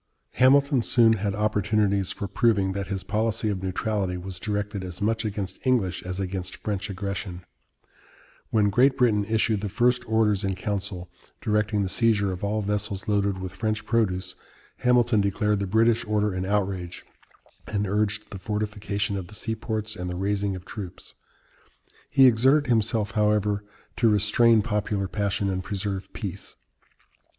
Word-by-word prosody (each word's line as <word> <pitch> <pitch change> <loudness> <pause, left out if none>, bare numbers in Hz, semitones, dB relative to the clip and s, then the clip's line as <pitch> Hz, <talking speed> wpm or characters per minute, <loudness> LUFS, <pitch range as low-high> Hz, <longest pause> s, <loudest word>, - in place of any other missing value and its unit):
Hamilton 140 +1 +4
soon 115 -1 +4
had 100 -2 -1
opportunities 105 -2 +1
for 100 - -4
proving 100 -4 +2
that 100 0 -4
his 95 -1 -4
policy 110 0 -1
of 95 -3 -2
neutrality 95 0 -1
was 90 0 -7
directed 105 -1 -3
as 90 -1 -7
much 110 +2 0
against 100 -3 -4
English 115 -9 +1
as 90 +1 -5
against 95 -1 -4
French 105 -1 -3
aggression. 95 -2 -5 1.0
When 105 -2 +2
Great 130 +6 +4
Britain 110 -5 +3
issued 110 -1 +1
the 105 - -3
first 125 +3 +2
Orders 110 -2 +2
in 95 -1 -1
Council, 95 -1 -4 0.3
directing 105 -1 0
the - - -1
seizure 100 0 +2
of 90 +1 -6
all 105 +1 0
vessels 105 +1 -2
loaded 100 -2 +1
with 95 -1 -5
French 110 -1 -2
produce, 100 -6 0 0.4
Hamilton 120 -3 +3
declared 105 +1 +1
the 100 - -2
British 115 +3 +3
order 105 -1 0
an 95 0 -2
outrage, 95 -3 -2 0.6
and 105 -1 -1
urged 105 +2 -1
the 95 - -7
fortification 105 0 -2
of 95 -2 -5
the 105 - -11
seaports 110 -1 -3
and 90 -2 -5
the 90 - -4
raising 100 +1 -1
of 90 0 -9
troops. 95 -5 -8 1.0
He 135 - +6
exerted 130 +5 +5
himself, 110 -2 +1
however, 105 -1 +1 0.3
to 115 - +4
restrain 110 +2 +4
popular 105 -3 -1
passion 100 0 -1
and 95 -1 -2
preserve 100 0 -4
peace. - - -6
105 Hz, 155 wpm, -25 LUFS, 95-110 Hz, 1.0 s, He